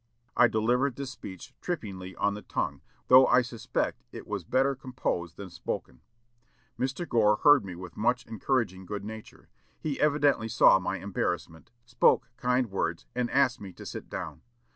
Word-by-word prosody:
I 125 - +6
delivered 120 +4 +1
this 140 -1 -5
speech 95 -7 -10
trippingly 95 - -5
on 100 - +1
the 105 - -7
tongue, - - -3 0.3
though 130 +1 +8
I 125 - +5
suspect 120 -2 -3
it - - -9
was 105 -3 -4
better 135 +9 +2
composed 125 -10 -3
than 95 -3 -8
spoken. 65 -6 -5 0.8
Mr. 135 +7 -2
Gore 105 -3 +4
heard 145 -4 +7
me 95 -2 -7
with 90 -1 -9
much 125 +3 +1
encouraging 110 -5 -1
good 100 0 -5
nature. 110 0 -10 0.3
He 150 -3 -3
evidently 145 -6 +3
saw 100 -3 +6
my 90 - -2
embarrassment; 90 -4 -3 0.2
spoke 120 0 +3
kind 125 -2 +1
words, 85 -3 -2
and 125 -1 -1
asked 135 -2 +2
me 100 -2 -7
to - - -11
sit - - -7
down. - - -6
115 Hz, 165 wpm, -28 LUFS, 95-130 Hz, 0.8 s, though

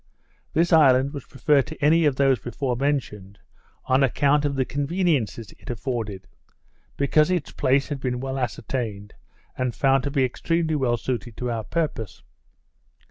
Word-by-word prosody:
This 170 +2 +2
island 140 -3 +5
was 140 -4 -7
preferred 140 -1 +2
to 160 - -8
any 160 +2 +4
of 145 -3 +2
those 135 -2 +3
before 125 +2 -3
mentioned, 120 -8 -2 0.5
on 130 +2 +3
account 145 +3 +2
of 140 -1 -1
the 130 -1 +1
conveniences 145 - -1
it - - -12
afforded; 115 -5 -4 0.7
because 150 +3 +3
its 180 -5 -1
place 135 0 +1
had 145 -2 -3
been 125 -2 -2
well 135 +1 -3
ascertained, 110 -4 -4 0.4
and 130 -2 -2
found 135 -1 +3
to - - 0
be 135 -2 +2
extremely 165 +5 -1
well 130 -5 +1
suited 120 -1 -4
to 125 -1 -2
our 115 -1 -3
purpose. 115 - -3
135 Hz, 155 wpm, -24 LUFS, 120-145 Hz, 0.7 s, island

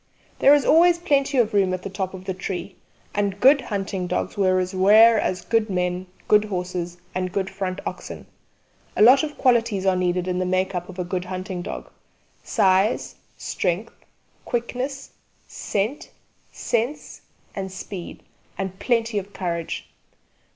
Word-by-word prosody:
There 280 +2 +7
is 290 - +1
always 340 +3 +5
plenty 280 -4 +1
of 230 -4 +2
room 190 -2 +2
at 185 - -9
the - - -4
top 190 -1 -3
of 185 0 -10
the 190 - -2
tree, 185 0 -5 0.4
and 200 -1 -1
good 275 +4 +6
hunting 195 -5 -3
dogs 180 - -2
were 185 -2 +2
as 185 +1 -2
rare 215 +4 +6
as 180 -2 -2
good 225 0 +1
men, 180 0 -1 0.2
good 210 0 +5
horses, 180 -3 -4 0.2
and 185 0 -2
good 195 0 -2
front 190 -1 -4
oxen. - - -6 0.7
A - - +6
lot 260 +4 +8
of 300 -1 -5
qualities 230 -6 +2
are 190 -1 +3
needed 180 0 0
in 180 0 -1
the - - +1
make 185 +1 0
up 180 0 -4
of 185 - -10
a 180 - -1
good 180 +1 -3
hunting 185 0 -5
dog: - - -7 0.5
size, 190 +2 +2 0.2
strength, 185 +5 -2 0.5
quickness, 250 +3 -4 0.4
scent, 215 +8 -3 0.4
sense 240 +6 -3 0.3
and 190 -1 -4
speed 185 -1 -8 0.3
and 190 -1 -4
plenty 230 -3 +1
of 200 +1 -11
courage. 170 -4 -4
195 Hz, 160 wpm, -23 LUFS, 185-230 Hz, 0.7 s, lot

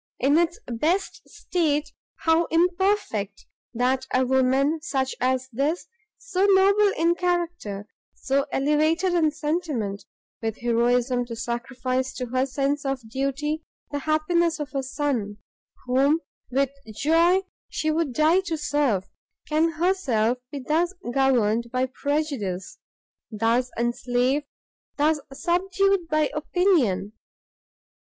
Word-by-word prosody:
in 275 +4 +3
its 340 +1 +2
best 315 +12 -1
state 310 -8 -1 0.3
how 325 +1 +3
imperfect! 345 - 0 0.3
that 255 +2 0
a 255 0 +2
woman 265 +4 +2
such 265 -3 -1
as 260 0 +1
this, 290 +8 0 0.3
so 390 0 0
noble 400 +2 +5
in 335 +1 +3
character, 345 - -2 0.3
so 275 +1 0
elevated 310 +6 +2
in 330 -3 +3
sentiment, 295 - -3 0.4
with 225 -1 -2
heroism 245 +1 +1
to 235 -1 -7
sacrifice 255 +3 -2
to 250 - -3
her 255 +2 0
sense 275 +2 -1
of 270 -4 -3
duty 280 +4 -2 0.3
the 290 - -2
happiness 315 +3 +1
of 295 0 -5
a 275 - 0
son, 260 -7 -2 0.5
whom 275 +5 +3 0.3
with 270 +1 +1 0.2
joy 335 - +4 0.3
she 310 - -1
would 315 -3 0
die 310 +7 +4
to 345 -4 -3
serve, 290 -10 0 0.4
can 320 +2 +2
herself 275 - +1
be 290 - -5
thus 325 +7 0 0.2
governed 235 -4 +2
by 255 0 +1
prejudice, 265 -9 -3 0.5
thus 230 +3 +1
enslaved, 245 +4 0 0.5
thus 300 +1 +2
subdued 370 +4 +1
by 305 -3 +1
opinion!" 300 - +1
285 Hz, 115 wpm, -25 LUFS, 250-330 Hz, 0.5 s, noble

